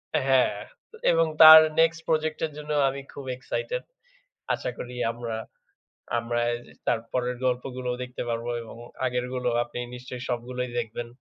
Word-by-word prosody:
অ্যা 145 Hz, -, +2 dB
হ্যাঁ 130 Hz, -1 st, +4 dB, 0.6 s
এবং 165 Hz, 0 st, +4 dB, 0.2 s
তার 160 Hz, 0 st, +13 dB, 0.2 s
নেক্সট 165 Hz, 0 st, +3 dB
প্রজেক্ট-এর 155 Hz, 0 st, 0 dB
জন্য 150 Hz, 0 st, -6 dB, 0.2 s
আমি 140 Hz, +1 st, -5 dB
খুব 140 Hz, -, -8 dB
এক্সাইটেড। -, -, -3 dB, 0.7 s
আশা -, -, -3 dB
করি 125 Hz, 0 st, -7 dB, 0.2 s
আমরা, 115 Hz, -1 st, -5 dB, 0.8 s
আমরা 120 Hz, 0 st, -1 dB
এইযে 120 Hz, 0 st, -7 dB
তার -, -, +2 dB
পরের 125 Hz, 0 st, -1 dB
গল্পগুলোও 125 Hz, 0 st, -2 dB
দেখতে 125 Hz, 0 st, -5 dB
পারবো 115 Hz, +1 st, -2 dB
এবং 115 Hz, -, -11 dB, 0.3 s
আগেরগুলো 125 Hz, 0 st, -2 dB, 0.2 s
আপনি 120 Hz, 0 st, -8 dB, 0.2 s
নিশ্চয়ই 125 Hz, 0 st, -8 dB
সবগুলোই 125 Hz, +1 st, -3 dB
দেখবেন। 115 Hz, +1 st, -4 dB
125 Hz, 140 wpm, -26 LUFS, 120-140 Hz, 0.8 s, তার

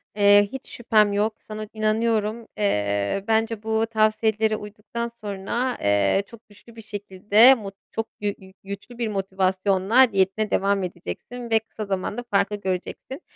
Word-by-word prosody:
Eee, 205 Hz, 0 st, +5 dB
hiç 265 Hz, -, -8 dB
şüphem 215 Hz, -3 st, +2 dB
yok, 215 Hz, +2 st, 0 dB
sana 215 Hz, 0 st, -6 dB
inanıyorum. 220 Hz, +1 st, 0 dB
Eee, 105 Hz, -, 0 dB
bence 225 Hz, -1 st, 0 dB
bu 220 Hz, 0 st, +1 dB
tavsiyelere 220 Hz, 0 st, +2 dB
uyduktan 210 Hz, +3 st, -6 dB
sonra, 210 Hz, +5 st, -2 dB
eee, 100 Hz, -, +2 dB
çok 230 Hz, -1 st, -16 dB
güçlü 225 Hz, +3 st, -18 dB
bir 225 Hz, -, -9 dB
şekilde, 210 Hz, +4 st, +4 dB
mut 200 Hz, -4 st, -8 dB, 0.2 s
çok 225 Hz, 0 st, -5 dB
gü 205 Hz, 0 st, 0 dB
gü 190 Hz, 0 st, -15 dB
güçlü 200 Hz, +5 st, -8 dB
bir 235 Hz, -2 st, -1 dB
motivasyonla 195 Hz, +4 st, +2 dB
diyetine 195 Hz, +2 st, +1 dB
devam 195 Hz, 0 st, +1 dB
edeceksin 235 Hz, -, -7 dB
ve 225 Hz, 0 st, +4 dB
kısa 220 Hz, -1 st, -8 dB
zamanda 200 Hz, +4 st, -3 dB
farkı 205 Hz, +1 st, +2 dB
göreceksin. 195 Hz, -, -5 dB
210 Hz, 145 wpm, -24 LUFS, 195-225 Hz, 0.2 s, Eee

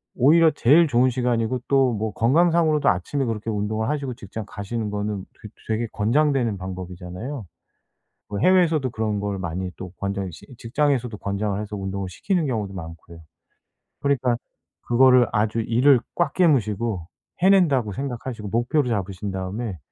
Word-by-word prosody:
오히려 160 Hz, +5 st, +5 dB
제일 155 Hz, +4 st, +5 dB
좋은 130 Hz, -1 st, +3 dB
시간이고 125 Hz, -1 st, 0 dB
또 135 Hz, -2 st, +4 dB
뭐 110 Hz, 0 st, -2 dB
건강 155 Hz, -, +3 dB
상으로도 160 Hz, -3 st, +3 dB
아침에 115 Hz, +10 st, -1 dB
그렇게 115 Hz, -1 st, -3 dB
운동을 110 Hz, +1 st, -1 dB
하시고 140 Hz, -4 st, -2 dB
직장 110 Hz, -2 st, -7 dB
가시는 105 Hz, +1 st, -4 dB
거는 105 Hz, -1 st, -3 dB, 0.2 s
되 105 Hz, -, -9 dB, 0.2 s
되게 110 Hz, +1 st, 0 dB
권장되는 120 Hz, -1 st, +1 dB
방법이잖아요. 95 Hz, +6 st, -7 dB, 0.9 s
뭐 100 Hz, -, -3 dB
해외에서도 165 Hz, -5 st, +3 dB
그런 110 Hz, -2 st, -2 dB
걸 100 Hz, -1 st, -3 dB
많이 90 Hz, +1 st, -4 dB
또 95 Hz, -1 st, -8 dB
권장 100 Hz, -1 st, -3 dB
시 -, -, -13 dB
직장에서도 125 Hz, -1 st, 0 dB
권장을 100 Hz, 0 st, -2 dB
해서 105 Hz, 0 st, -5 dB
운동을 95 Hz, -1 st, -4 dB
시키는 175 Hz, -, -1 dB
경우도 105 Hz, -6 st, -2 dB
많고요. 85 Hz, -1 st, -9 dB, 0.8 s
그러니까 130 Hz, -4 st, +1 dB, 0.5 s
그거를 125 Hz, 0 st, +5 dB
아주 110 Hz, +2 st, 0 dB
이를 125 Hz, +4 st, +4 dB, 0.2 s
꽉 175 Hz, -, 0 dB
깨무시고 115 Hz, -, +1 dB, 0.4 s
해낸다고 170 Hz, -, +4 dB
생각하시고 120 Hz, -3 st, -5 dB
목표로 120 Hz, +5 st, +1 dB
잡으신 100 Hz, -2 st, -3 dB
다음에 95 Hz, +2 st, -4 dB
115 Hz, 370 characters per minute, -23 LUFS, 100-135 Hz, 0.9 s, 오히려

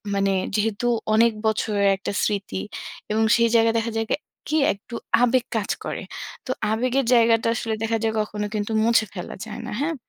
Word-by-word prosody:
মানে 195 Hz, 0 st, +2 dB, 0.2 s
যেহেতু 220 Hz, +2 st, 0 dB, 0.3 s
অনেক 230 Hz, +1 st, +5 dB
বছরের 210 Hz, -2 st, +1 dB
একটা -, -, -4 dB
স্মৃতি 200 Hz, -, -1 dB, 0.5 s
এবং 220 Hz, +1 st, +2 dB
সেই 235 Hz, -1 st, +3 dB
জায়গায় 225 Hz, 0 st, +4 dB
দেখা 230 Hz, 0 st, -2 dB
যায় 225 Hz, -, -1 dB
কি, -, -, +4 dB, 0.3 s
কি 310 Hz, -, +1 dB, 0.2 s
একটু 215 Hz, +4 st, -11 dB, 0.3 s
আবেগ 245 Hz, 0 st, +3 dB
কাজ 205 Hz, -, -2 dB, 0.2 s
করে। -, -, -4 dB, 0.4 s
তো 255 Hz, -, -2 dB, 0.2 s
আবেগের 250 Hz, +3 st, +1 dB
জায়গাটা 230 Hz, -1 st, +4 dB
আসলে 225 Hz, -2 st, -2 dB
দেখা 225 Hz, 0 st, +1 dB
যায় 220 Hz, -, +1 dB
কখনো 210 Hz, 0 st, -3 dB
কিন্তু 210 Hz, +1 st, -2 dB
মুছে 230 Hz, -1 st, +4 dB
ফেলা 180 Hz, -3 st, -6 dB
যায় 215 Hz, -1 st, -7 dB
না। -, -, -5 dB
হ্যাঁ? 325 Hz, +2 st, 0 dB
225 Hz, 180 wpm, -23 LUFS, 210-235 Hz, 0.5 s, অনেক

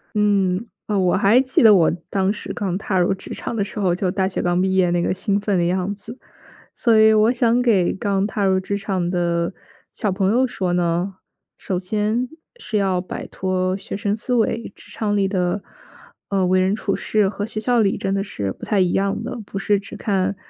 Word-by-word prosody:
嗯， 200 Hz, -1 st, +2 dB, 0.2 s
哦， 210 Hz, -, 0 dB
我 185 Hz, -2 st, +2 dB
还 205 Hz, +5 st, +5 dB
记 260 Hz, 0 st, +1 dB
得 220 Hz, -2 st, +8 dB
我 170 Hz, -4 st, +4 dB, 0.2 s
当 195 Hz, 0 st, +1 dB
时 210 Hz, -, -7 dB
刚 190 Hz, -4 st, -2 dB
踏 195 Hz, -1 st, -2 dB
入 180 Hz, +2 st, +3 dB
职 190 Hz, -, -10 dB
场 -, -, -5 dB
的 210 Hz, -, 0 dB
时 205 Hz, -, -9 dB
候， 185 Hz, -3 st, +2 dB
就 185 Hz, +1 st, -1 dB
大 190 Hz, +1 st, 0 dB
学 190 Hz, -, -3 dB
刚 175 Hz, 0 st, +1 dB
毕 190 Hz, 0 st, +1 dB
业 185 Hz, -2 st, +3 dB
那 175 Hz, 0 st, +1 dB
个 -, -, +1 dB
兴 200 Hz, +2 st, 0 dB
奋 205 Hz, -2 st, 0 dB
的 175 Hz, -, +2 dB
样 185 Hz, +3 st, 0 dB
子。 220 Hz, +4 st, -10 dB, 0.6 s
所 230 Hz, -3 st, +3 dB
以 220 Hz, 0 st, +6 dB
我 215 Hz, +2 st, +4 dB
想 240 Hz, -1 st, +2 dB
给 205 Hz, -8 st, +3 dB
刚 195 Hz, 0 st, 0 dB
踏 205 Hz, 0 st, -2 dB
入 190 Hz, -1 st, +3 dB
职 195 Hz, +2 st, -3 dB
场 190 Hz, -3 st, -2 dB
的 170 Hz, -1 st, 0 dB, 0.4 s
小 210 Hz, -4 st, -1 dB
朋 190 Hz, +1 st, +1 dB
友 255 Hz, +3 st, +3 dB
说 185 Hz, -7 st, -2 dB
呢， 175 Hz, +2 st, 0 dB, 0.4 s
首 185 Hz, -, -3 dB
先 210 Hz, +6 st, -1 dB, 0.3 s
是 225 Hz, -, -3 dB
要 190 Hz, -3 st, +1 dB
摆 180 Hz, -, -6 dB
脱 185 Hz, 0 st, -1 dB
学 -, -, -7 dB
生 205 Hz, 0 st, -1 dB
思 240 Hz, +3 st, -4 dB
维， 230 Hz, -1 st, 0 dB
职 -, -, -14 dB
场 210 Hz, -2 st, -1 dB
里 200 Hz, -1 st, +2 dB
的， 185 Hz, 0 st, -1 dB, 0.7 s
嗯， 195 Hz, -2 st, +1 dB
为 185 Hz, 0 st, +3 dB
人 185 Hz, +1 st, +2 dB
处 205 Hz, -2 st, -2 dB
事 210 Hz, -3 st, +1 dB
和 205 Hz, +1 st, -4 dB
学 215 Hz, -, -5 dB
校 240 Hz, +2 st, +2 dB
里 200 Hz, -3 st, +2 dB
真 195 Hz, 0 st, -1 dB
的 195 Hz, -, 0 dB
是 100 Hz, -, -4 dB
不 -, -, -9 dB
太 210 Hz, -, +1 dB
一 180 Hz, -2 st, +2 dB
样 195 Hz, +2 st, 0 dB
的， 245 Hz, +1 st, -5 dB
不 195 Hz, -, -5 dB
是 205 Hz, +1 st, +2 dB
只 200 Hz, -, -10 dB
看 195 Hz, -1 st, -1 dB
195 Hz, 235 characters per minute, -21 LUFS, 185-210 Hz, 0.7 s, 得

